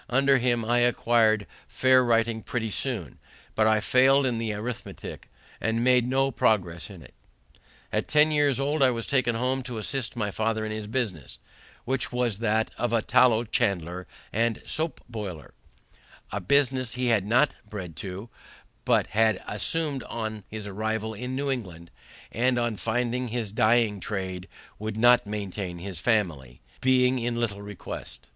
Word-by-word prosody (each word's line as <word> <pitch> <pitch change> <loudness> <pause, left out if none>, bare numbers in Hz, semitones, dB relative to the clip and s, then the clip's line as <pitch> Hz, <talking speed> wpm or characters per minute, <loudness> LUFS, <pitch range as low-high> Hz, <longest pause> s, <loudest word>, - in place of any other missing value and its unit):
Under 135 +2 +4
him 120 -2 +1
I 120 +2 +2
acquired 115 -3 +3 0.2
fair 130 0 +4
writing 115 -1 +1
pretty 110 -1 -3
soon, 105 - -3 0.3
but 110 0 +3
I 110 0 +4
failed 135 +5 +4
in 120 -3 0
the 115 -1 -2
arithmetic, 110 +3 -6 0.3
and 115 +2 0
made 125 -1 +4
no 135 +1 +2
progress 90 -8 +1
in 95 -6 -11
it. 65 - -16 0.8
At - - 0
ten 150 +1 +4
years 145 -3 +2
old 145 +2 0
I 135 - +6
was 115 -2 -2
taken 125 -4 +1
home 130 +3 0
to 125 -2 -6
assist 125 +3 -3
my 105 -3 -2
father 110 +1 -1
in 110 - -4
his 110 -1 -5
business, 95 - -3 0.5
which 130 +1 -1
was 120 -4 -1
that 110 -1 +1
of 120 -1 0
a 115 -2 +2
tallow 120 -3 +4
chandler 90 -7 -1 0.3
and 115 +1 0
sope 160 +1 -2
boiler; 100 -9 -7 0.8
a 105 - -3
business 130 +2 +1
he 125 -2 +1
was 105 - +3
not 125 +8 +3 0.2
bred 90 -6 -7
to, 100 +2 -6 0.6
but - - +3
had 110 -2 +1
assumed 145 +6 0
on 110 -2 -5
his 110 -1 -7
arrival 110 +2 -2
in 125 +4 -5
New 140 +1 -1
England, 90 -10 -6 0.4
and 125 +3 +1
on 120 -2 0
finding 120 +4 -1
his 115 -3 -3
dyeing 110 -1 +3
trade 95 -2 -4 0.3
would 110 0 -4
not 120 -1 +5
maintain 100 -3 -4
his 90 -1 -6
family, 85 - 0 0.2
being 130 0 +3
in 120 0 -1
little 105 -4 -2
request. 95 -10 -8
115 Hz, 160 wpm, -26 LUFS, 105-125 Hz, 0.8 s, I